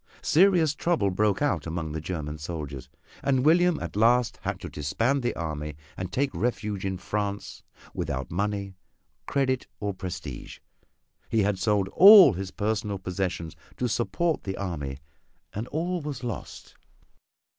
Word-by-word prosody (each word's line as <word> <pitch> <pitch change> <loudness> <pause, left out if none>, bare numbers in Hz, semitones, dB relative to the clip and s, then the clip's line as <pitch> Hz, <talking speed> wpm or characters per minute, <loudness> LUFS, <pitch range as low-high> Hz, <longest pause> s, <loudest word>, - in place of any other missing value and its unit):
Serious 170 -3 +4
trouble 155 - +1
broke 105 +5 +1
out 85 - 0
among 80 -1 -3
the 80 +1 -4
German 75 -3 -5
soldiers, 75 -5 -6 0.3
and 135 -1 +1
William 175 +2 +4
at - - -6
last 115 +2 +3
had - - -3
to - - -7
disband 115 - 0
the 120 - -1
army 75 -2 -4 0.2
and 95 -1 -5
take 135 +6 0
refuge 105 -5 -2
in 95 -1 -2
France 100 +1 -4 0.3
without 65 +1 -3
money, 100 +1 -2 0.5
credit 130 -2 0
or 100 -1 -2
prestige. 95 -2 -7 0.7
He 110 -2 +2
had 100 -1 0
sold 100 -1 +1
all 195 - +9
his 95 +1 -4
personal 105 0 -2
possessions 90 -3 -3 0.2
to 125 - 0
support 155 +8 0
the 95 -1 -4
army 75 -8 -4 0.6
and 110 +4 -4
all 175 +3 -2
was 145 -4 -6
lost. 120 -2 -6
105 Hz, 145 wpm, -27 LUFS, 90-130 Hz, 0.7 s, all